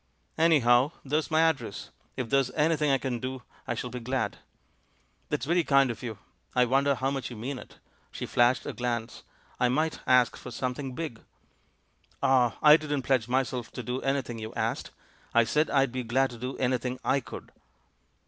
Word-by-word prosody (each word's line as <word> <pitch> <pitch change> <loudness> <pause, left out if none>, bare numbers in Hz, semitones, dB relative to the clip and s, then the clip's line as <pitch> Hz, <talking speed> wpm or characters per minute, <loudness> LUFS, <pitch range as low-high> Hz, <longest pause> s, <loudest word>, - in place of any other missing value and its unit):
"Anyhow, 140 -3 +4
there's 150 +3 0
my 160 0 +3
address. 140 -11 -1 0.3
If 120 -3 -3
there's 135 -2 +3
any 160 +2 +3
thing 150 -1 0
I 135 - +4
can 125 -2 -3
do 130 0 -5 0.2
I - - -1
shall - - -5
be 125 - -5
glad." 120 -3 -2 0.9
"That's - - -1
very 170 +3 +2
kind 140 -4 +4
of 110 - -8
you. 115 -4 -5 0.4
I 125 0 +5
wonder 135 +3 +2
how 135 +2 -1
much 135 -2 -3
you 120 - -8
mean 125 +4 -5
it?" - - -14 0.3
She - - -5
flashed 120 +1 +2
a - - -4
glance. 120 -2 -3 0.4
"I 125 - +3
might 155 +5 0
ask 125 -1 +4
for - - -9
something 130 0 -4
big." 155 -8 -5 1.0
"Ah, 125 -3 +3
I 150 0 +9
didn't 145 -4 -3
pledge 125 -4 +1
myself 125 -1 -1
to 125 - -5
do 125 +2 -3
anything 135 -4 -1
you 110 0 -7
asked; - - -2 0.5
I 115 - +7
said 150 +8 +1
I'd 135 -2 +2
be 130 +1 -3
glad 130 +3 +1
to 120 - -10
do 125 +2 -5
anything 125 0 -1
I 140 - +3
could." - - -10
130 Hz, 185 wpm, -28 LUFS, 120-140 Hz, 1.0 s, I